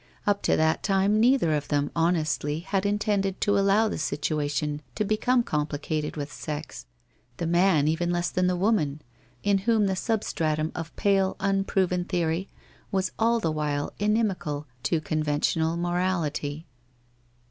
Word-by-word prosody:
Up 205 -1 +1
to - - +2
that 160 0 +2
time 195 +2 +2
neither 235 - +4
of 150 -1 -1
them, 145 -1 0
honestly, 160 -2 0
had 195 +2 -1
intended 205 -2 0
to 205 - +2
allow 200 +3 +4
the - - -3
situation 150 0 -1
to 215 - 0
become 235 +4 +2
complicated 150 -1 -2
with 145 -1 -5
sex, 150 - -6 0.5
the 170 - -2
man 170 -3 +3
even 160 +2 0
less 175 0 0
than 180 0 +1
the 180 - +1
woman, 175 -7 0 0.4
in 200 -1 +3
whom 215 +1 +2
the 190 -1 0
substratum 160 -8 -1
of 165 -2 -6
pale 195 -2 +2
unproven 195 -2 +1
theory 175 0 -1 0.4
was 190 -1 0
all 230 +1 +3
the 165 -8 0
while 150 -2 -2
inimical 195 -9 0 0.2
to 160 +5 0
con 155 +1 -1
ventional 160 +2 0
morality. 170 -4 -1
175 Hz, 145 wpm, -26 LUFS, 155-195 Hz, 0.5 s, neither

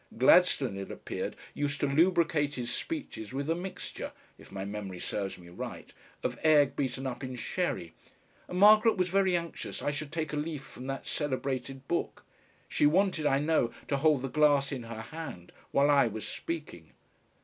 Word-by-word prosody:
Gladstone 130 - +5
it 95 - -6
appeared - - -5 0.2
used 145 -1 -2
to - - +3
lubricate 155 -1 +3
his 120 -2 -2
speeches 275 - -4
with 140 +2 -2
a - - +4
mixture 180 +3 -6 0.2
if - - -16
my 95 0 -4
memory 100 -2 -5
serves 100 +1 -3
me 85 -1 -13
right 85 - -7 0.3
of - - -2
egg 145 -3 +5
beaten 135 -1 -2
up 130 0 -4
in 130 -1 -4
sherry, 120 - -2 0.5
and 180 - -4
Margaret 215 +3 +7
was 180 -1 +1
very 190 -1 +3
anxious 170 -1 -5
I 145 - +1
should 145 0 -5
take 155 -2 -3
a - - -1
leaf 150 -2 -3
from 130 -1 -10
that 135 0 -4
celebrated 135 -2 -3
book. 170 - -2 0.4
She 145 - +3
wanted, 170 -1 +2
I 135 - +3
know, 150 -5 +2 0.2
to 140 - +2
hold 145 -2 +3
the - - -1
glass 145 -1 +3
in 130 -4 -4
her 115 -1 -5
hand 130 - -8 0.2
while 140 +1 +4
I 140 -4 +5
was 110 -1 -5
speaking. 150 - -6
140 Hz, 180 wpm, -30 LUFS, 125-160 Hz, 0.5 s, Margaret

